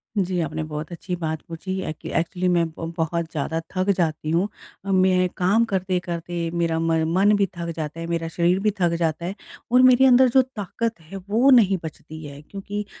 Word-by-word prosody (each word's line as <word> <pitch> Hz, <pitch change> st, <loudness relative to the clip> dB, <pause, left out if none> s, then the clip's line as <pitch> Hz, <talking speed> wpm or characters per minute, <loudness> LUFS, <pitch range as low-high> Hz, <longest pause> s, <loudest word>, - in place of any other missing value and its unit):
जी, 185 Hz, -3 st, 0 dB
आपने 160 Hz, -1 st, -3 dB
बहुत 155 Hz, +1 st, -6 dB
अच्छी 180 Hz, +2 st, -4 dB
बात 160 Hz, -2 st, -3 dB
पूछी 185 Hz, +3 st, -5 dB
है 190 Hz, -, -3 dB
कि -, -, -6 dB
एक्चुअली 180 Hz, +2 st, -2 dB
मैं 170 Hz, -1 st, +3 dB
ब 165 Hz, 0 st, -5 dB
बहुत 165 Hz, +1 st, -1 dB
ज़्यादा 160 Hz, +1 st, -2 dB, 0.2 s
थक 185 Hz, +2 st, 0 dB
जाती 155 Hz, -3 st, -1 dB
हूँ, 175 Hz, +5 st, +2 dB, 0.4 s
मैं 185 Hz, -1 st, +3 dB
काम 200 Hz, +6 st, +3 dB
करते-करते 175 Hz, -4 st, -2 dB
मेरा 165 Hz, -1 st, 0 dB
म 165 Hz, 0 st, +1 dB, 0.2 s
मन 205 Hz, +2 st, +5 dB
भी 200 Hz, -, +3 dB
थक 170 Hz, 0 st, -4 dB
जाता 155 Hz, 0 st, -5 dB
है, 165 Hz, -, -4 dB
मेरा 165 Hz, -1 st, -2 dB
शरीर 175 Hz, +3 st, +1 dB
भी 210 Hz, +1 st, +1 dB
थक 175 Hz, -2 st, +2 dB
जाता 165 Hz, 0 st, -1 dB
है 190 Hz, +3 st, -4 dB, 0.4 s
और 250 Hz, +1 st, +6 dB
मेरे 255 Hz, +1 st, +6 dB
अंदर 255 Hz, 0 st, +6 dB
जो 265 Hz, +2 st, +5 dB
ताकत 230 Hz, -3 st, -4 dB
है 165 Hz, +5 st, -9 dB
वो 235 Hz, +6 st, +4 dB
नहीं 205 Hz, -7 st, +5 dB
बचती 155 Hz, 0 st, -9 dB
है। 140 Hz, 0 st, -9 dB
क्योंकि 200 Hz, +5 st, -6 dB
175 Hz, 200 wpm, -23 LUFS, 165-200 Hz, 0.4 s, और